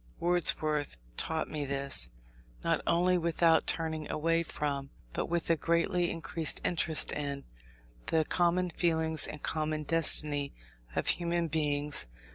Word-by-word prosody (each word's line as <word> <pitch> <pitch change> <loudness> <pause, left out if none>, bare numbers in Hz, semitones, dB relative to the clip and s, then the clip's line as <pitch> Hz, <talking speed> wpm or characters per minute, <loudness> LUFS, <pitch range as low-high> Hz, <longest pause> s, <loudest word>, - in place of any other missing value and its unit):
Wordsworth 155 - +1 0.2
taught 160 - -2
me 150 -2 -3
this, 140 - +1 0.5
not - - +1
only 180 +1 +3
without 165 -1 +2
turning 160 -2 0
away 165 +2 +1
from, 140 -4 -3 0.2
but - - -2
with 170 -1 -1
a - - +4
greatly 170 +3 +1
increased 165 -1 0
interest 160 -2 +1
in, 140 -1 -4 0.6
the 160 -1 +2
common 175 +1 +1
feelings 160 -2 +2
and 150 - -8
common 155 -1 -2
destiny 150 -2 +2 0.4
of - - -1
human 170 -1 0
beings. 145 - +2
160 Hz, 125 wpm, -31 LUFS, 150-170 Hz, 0.6 s, a